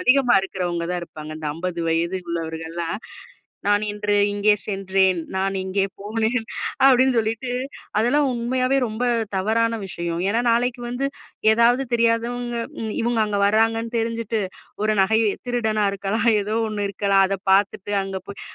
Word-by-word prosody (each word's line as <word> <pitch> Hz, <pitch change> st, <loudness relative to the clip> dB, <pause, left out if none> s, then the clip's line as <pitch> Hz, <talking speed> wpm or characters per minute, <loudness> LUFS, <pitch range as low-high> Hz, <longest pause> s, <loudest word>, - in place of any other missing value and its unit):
அதிகமா 255 Hz, +3 st, +4 dB
இருக்குறவங்க 175 Hz, -3 st, -3 dB
தான் 180 Hz, -, -1 dB
இருப்பாங்க. 155 Hz, -2 st, -9 dB
இந்த 155 Hz, -, -5 dB
50 175 Hz, +1 st, -3 dB
வயது 170 Hz, +3 st, 0 dB
உள்ளவர்கள்லாம். 165 Hz, +2 st, -4 dB, 0.7 s
"நான் 205 Hz, 0 st, +3 dB
இன்று 210 Hz, 0 st, 0 dB, 0.2 s
இங்கே 205 Hz, +1 st, +3 dB
சென்றேன். 190 Hz, -3 st, +1 dB, 0.2 s
நான் 195 Hz, 0 st, 0 dB
இங்கே 190 Hz, +1 st, 0 dB, 0.2 s
போனேன்!" 225 Hz, +3 st, -1 dB, 0.4 s
அப்பிடின்னு 260 Hz, -1 st, +5 dB
சொல்லிட்டு. 225 Hz, +3 st, -1 dB, 0.5 s
அதெல்லாம் 265 Hz, +7 st, +3 dB
உண்மையாவே 255 Hz, +2 st, 0 dB
ரொம்ப 220 Hz, +2 st, -5 dB, 0.3 s
தவறான 225 Hz, +3 st, +1 dB
விஷயம். 170 Hz, -1 st, -4 dB
ஏன்னா, 230 Hz, +2 st, +1 dB
நாளைக்கு 245 Hz, +1 st, +1 dB
வந்து 245 Hz, +3 st, -1 dB, 0.5 s
ஏதாவது 240 Hz, +4 st, +4 dB
தெரியாதவங்க, 235 Hz, +1 st, 0 dB, 0.3 s
இம் 220 Hz, -1 st, -3 dB
இவுங்க 235 Hz, -1 st, +1 dB
அங்க 205 Hz, -1 st, -1 dB
வர்றாங்கன்னு 225 Hz, +2 st, +1 dB
தெரிஞ்சுட்டு, 230 Hz, -1 st, -1 dB, 0.4 s
ஒரு 215 Hz, -, +3 dB
நகை. 220 Hz, +3 st, +3 dB, 0.3 s
திருடனா 220 Hz, -3 st, +1 dB
இருக்கலாம் 200 Hz, +4 st, -1 dB
ஏதோ 210 Hz, +2 st, -2 dB
ஒண்ணு 205 Hz, -1 st, -2 dB
இருக்கலாம். 195 Hz, -1 st, +3 dB
அத 195 Hz, 0 st, -1 dB
பாத்துட்டு, 200 Hz, 0 st, +1 dB
அங்க 195 Hz, 0 st, -4 dB
போய் 200 Hz, -, -9 dB
215 Hz, 140 wpm, -22 LUFS, 190-235 Hz, 0.7 s, அப்பிடின்னு